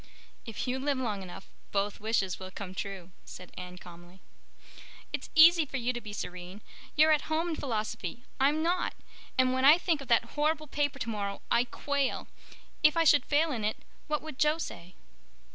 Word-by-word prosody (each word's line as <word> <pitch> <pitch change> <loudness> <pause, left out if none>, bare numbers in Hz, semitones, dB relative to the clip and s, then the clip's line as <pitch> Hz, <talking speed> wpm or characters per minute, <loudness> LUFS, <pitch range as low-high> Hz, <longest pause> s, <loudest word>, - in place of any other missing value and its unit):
"If 225 +3 -4
you 255 +1 -1
live 280 0 0
long 215 -6 -2
enough 185 0 -9 0.2
both 200 0 -1
wishes 205 -4 0
will 185 0 -7
come 185 0 -7
true," 190 -2 -6
said 180 -1 -11
Anne 180 0 -8
calmly. 175 +1 -13 0.9
"It's - - -4
easy 330 +1 +8
for 275 -2 -4
you 250 0 0
to 240 - -5
be 210 - -8
serene. 180 0 -7 0.3
You're 310 +1 +6
at 305 0 +1
home 320 +2 0
in 325 - -1
Philosophy. 220 - -3 0.2
I'm 290 +4 +3
not—and 300 -6 -1
when 260 0 0
I 295 +4 +9
think 335 -4 0
of 275 - -9
that 235 -1 +2
horrible 305 +1 +1
paper 285 -1 -1
tomorrow 210 -5 -3
I 240 - +4
quail. 280 +2 -2 0.5
If 300 +2 +5
I 330 - +5
should 290 -2 +5
fail 305 +2 +3
in 230 -6 -3
it 215 - 0 0.3
what 305 -1 -1
would 310 -4 -8
Jo 300 +1 +3
say?" 175 - -7
255 Hz, 180 wpm, -30 LUFS, 200-300 Hz, 0.9 s, I